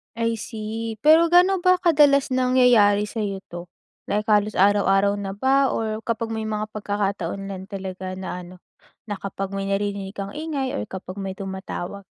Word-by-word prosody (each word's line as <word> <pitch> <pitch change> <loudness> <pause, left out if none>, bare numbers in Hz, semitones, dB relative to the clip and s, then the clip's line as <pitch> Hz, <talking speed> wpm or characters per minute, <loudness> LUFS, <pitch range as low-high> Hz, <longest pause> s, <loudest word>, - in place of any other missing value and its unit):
I 230 0 -1
see. 220 0 -5
Pero 315 +3 +6
ga'no 360 +3 +5
ba 365 0 +3
kadalas 290 -5 +4
nangyayari 250 -5 +4
sa'yo 200 -4 -3
'to? 175 0 -7 0.4
Like, 210 +1 -2
halos 210 0 +3
araw-araw 200 0 +3
na 195 -1 -4
ba 265 +5 +2
or 220 -1 -3
kapag 230 -1 -2
may 220 -1 -3
mga 215 0 -3
pagkakataon 200 -2 -2
lang 190 -1 -6
talaga 190 -2 -6
na 185 -1 -5
ano, 180 +1 -12 0.5
na 205 - -2
kapag 195 0 -5
may 195 - -2
naririnig 200 0 -2
kang 195 -2 -5
ingay 285 -4 -3
or - - -2
kapag 190 0 -8
may 195 -1 -4
tumatawag? 190 0 -6
210 Hz, 165 wpm, -23 LUFS, 195-245 Hz, 0.5 s, Pero